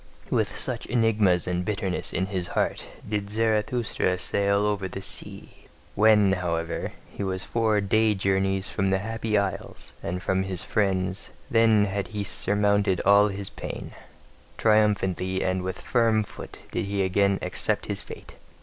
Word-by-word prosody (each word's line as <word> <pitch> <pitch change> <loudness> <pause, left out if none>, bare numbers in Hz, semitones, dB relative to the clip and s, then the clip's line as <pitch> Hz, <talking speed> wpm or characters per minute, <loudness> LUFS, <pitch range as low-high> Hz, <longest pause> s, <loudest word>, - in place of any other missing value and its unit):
With - - 0
such - - -1
enigmas 110 -6 +2
and 90 0 -1
bitterness 100 -2 -2
in 95 - 0
his 95 -2 -3
heart - - -1 0.2
did 105 -1 -2
Zarathustra 110 -2 0
sail 100 +2 +1
o'er 105 -2 -1
the 95 - -7
sea. - - -9 0.3
When, 105 -2 +5
however, 85 -3 -2 0.2
he - - -5
was 95 -1 -2
four 110 -3 +1
day 110 +2 +2
journeys 95 0 0
from 95 -1 0
the 95 - +2
Happy 110 +1 -1
Isles 100 -2 -3
and 90 +2 -3
from 95 +1 0
his 95 -2 -3
friends, 95 -2 -1 0.2
then 115 -2 +5
had 100 0 -2
he 105 -2 -4
surmounted 100 -1 +1
all 100 +1 +6
his 100 -1 -3
pain: - - -7 0.7
triumphantly 95 -4 +2
and 95 0 0
with 95 +1 -4
firm 115 -3 +2
foot - - -10
did 115 - -2
he 100 0 0
again 100 +1 +2
accept 90 - -1
his - - -2
fate. - - -11
100 Hz, 150 wpm, -26 LUFS, 95-105 Hz, 0.7 s, all